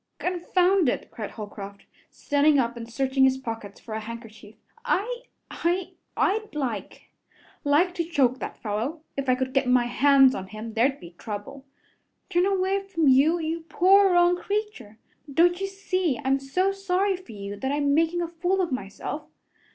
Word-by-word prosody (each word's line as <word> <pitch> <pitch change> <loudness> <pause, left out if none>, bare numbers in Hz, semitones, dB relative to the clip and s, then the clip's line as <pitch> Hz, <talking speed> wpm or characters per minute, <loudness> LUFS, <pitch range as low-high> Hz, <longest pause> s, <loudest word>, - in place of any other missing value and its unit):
"Confound 360 -1 +2
it!" - - -4
cried 215 -3 -6
Holcroft, 200 -2 -9 0.2
standing 290 +1 +2
up 240 -2 +1
and 235 0 -8
searching 265 +2 +1
his 265 0 +4
pockets 225 -6 -7
for 220 - -9
a 220 - -2
handkerchief. 220 -1 -10 0.3
"I 485 +3 -1 0.3
I 350 +2 -1 0.3
I'd 430 -2 0
like 235 -9 -4 0.5
like 315 +5 +3
to 350 -2 -1
choke 270 -6 +1
that - - -6
fellow. 230 +9 -3
If 275 -1 -2
I 255 - +5
could 260 0 -3
get 270 -1 +2
my 250 -1 +4
hands 270 +1 +5
on 190 0 -5
him, 215 +2 -8
there'd 265 +5 +1
be 170 - -11
trouble. 215 +6 -7 0.7
Turn 355 +2 +3
away 390 0 +1
from 340 -7 +1
you, 285 +6 +5
you 325 0 -2
poor 390 +2 +5
wronged 350 0 +4
creature! 400 - -4 0.3
Don't 350 +5 +3
you 390 - 0
see 370 -6 -1
I'm 270 +1 +2
so 365 +9 0
sorry 390 0 0
for 360 -11 -12
you 200 0 -6
that 265 +6 -2
I'm 285 0 +1
making 330 +3 +2
a - - -2
fool 355 +3 -1
of 360 -5 0
myself? 200 -6 -5
285 Hz, 170 wpm, -25 LUFS, 240-360 Hz, 0.7 s, I